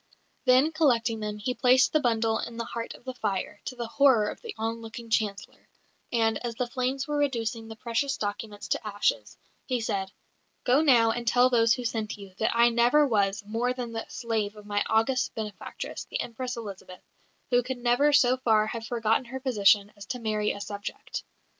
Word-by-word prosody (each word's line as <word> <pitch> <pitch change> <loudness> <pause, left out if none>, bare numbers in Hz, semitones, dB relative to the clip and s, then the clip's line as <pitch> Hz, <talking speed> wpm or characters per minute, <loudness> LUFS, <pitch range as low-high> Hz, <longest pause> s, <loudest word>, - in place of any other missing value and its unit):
Then, 260 +5 +5
collecting 240 -8 +2
them, 210 -1 -4
he 220 +5 -2
placed 255 0 +4
the 310 - +4
bundle 225 -4 +1
in 235 - -6
the 230 - -3
heart 230 -1 -5
of - - -17
the 260 0 -5
fire, 205 -3 -3
to 255 - -5
the 240 -1 -4
horror 235 -3 +4
of - - -8
the 460 -3 -7
onlooking 225 +1 -5
Chancellor; 205 -3 -2 0.4
and, 225 -2 +1
as 235 -1 -3
the 250 - -1
flames 260 +2 -2
were 295 0 -1
reducing 230 -5 -1
the 225 - -8
precious 240 +5 -1
documents 205 0 -5
to 220 - -1
ashes, 205 -1 -1 0.3
he 255 -2 0
said, 195 -4 -2 0.5
"Go 260 +4 +4
now 240 -7 +5
and 235 +1 -4
tell 245 +2 +4
those 230 -1 +4
who 250 - -6
sent 220 -2 -2
you, 200 -2 -11
that 220 +1 +1
I 235 0 +6
never 240 +6 +4
was 200 -3 +1
more 230 +4 -1
than 245 -2 -5
the 225 0 -5
slave 220 -3 -2
of 210 -1 -12
my 205 0 0
august 235 +4 +1
benefactress, 215 -2 -6
the - - -4
Empress 250 +1 -4
Elizabeth, 195 -4 -9 0.5
who 245 0 +5
could 255 +1 -4
never 245 +4 +3
so 255 -3 +4
far 220 -4 +3
have 225 0 -5
forgotten 225 +1 +1
her 260 +2 -6
position 210 -5 +3
as 205 - -11
to 250 - -4
marry 215 -2 0
a - - -6
subject." 205 0 -6
230 Hz, 195 wpm, -27 LUFS, 215-250 Hz, 0.5 s, I